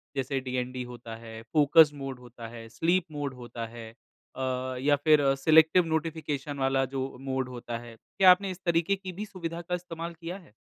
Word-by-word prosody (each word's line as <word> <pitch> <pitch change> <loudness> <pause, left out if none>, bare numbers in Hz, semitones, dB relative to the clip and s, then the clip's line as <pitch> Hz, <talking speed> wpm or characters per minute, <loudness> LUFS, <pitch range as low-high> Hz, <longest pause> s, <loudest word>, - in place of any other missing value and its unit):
जैसे 135 0 -1
डीएनडी 125 0 -3
होता 120 -2 -8
है, 115 -1 -9
फ़ोकस 150 0 +7
मोड 135 -3 -6
होता 120 -2 -10
है, 115 0 -9
स्लीप 170 +10 +1
मोड 145 -2 -3
होता 120 -2 -7
है 115 -1 -9 0.4
अ, 130 - -5 0.4
या 145 +2 +4
फिर 155 -2 +6
सिलेक्टिव 160 +4 +5
नोटिफ़िकेशन 155 -3 -2
वाला 135 0 +2
जो 135 +1 -5 0.2
मोड 130 -1 -2
होता 120 -1 -5
है, 120 -1 -11 0.2
क्या 185 -1 +9
आपने 190 +2 +3
इस 180 - -8
तरीके 170 +3 +2
की 190 -1 -7
भी 210 +4 -5
सुविधा 170 -4 -5
का 180 +1 -2
इस्तेमाल 170 -1 -6
किया 175 +3 -4
है? 180 - -16
145 Hz, 185 wpm, -28 LUFS, 125-165 Hz, 0.4 s, क्या